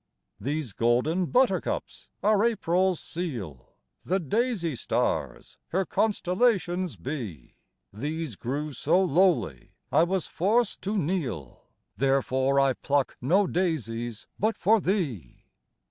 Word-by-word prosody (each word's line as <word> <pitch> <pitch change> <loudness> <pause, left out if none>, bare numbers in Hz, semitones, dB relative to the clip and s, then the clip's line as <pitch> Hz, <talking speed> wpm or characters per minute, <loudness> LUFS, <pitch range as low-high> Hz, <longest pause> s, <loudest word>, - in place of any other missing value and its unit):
These 145 -5 -3
golden 125 - +1
Buttercups 245 -4 0 0.2
are 210 0 +4
April's 185 -5 +1
seal, 120 - -6 0.3
The 190 +3 0
Daisy 190 - 0
stars 115 - -2
her 190 +2 0
constellations 185 - +1
be: 115 - -6 0.4
These 150 +3 -4
grew 145 +8 -3
so 160 +8 +2
lowly, 165 - +1 0.2
I - - +5
was 180 +1 +1
forced 215 +5 +1
to 205 +2 -2
kneel, 140 - -3 0.3
Therefore 135 0 +2
I 135 -1 +4
pluck 140 +1 0
no 185 +11 +3
Daisies 120 - -2
but 220 +3 +1
for 215 +3 +3
thee! 150 - -2
160 Hz, 110 wpm, -27 LUFS, 130-190 Hz, 0.4 s, I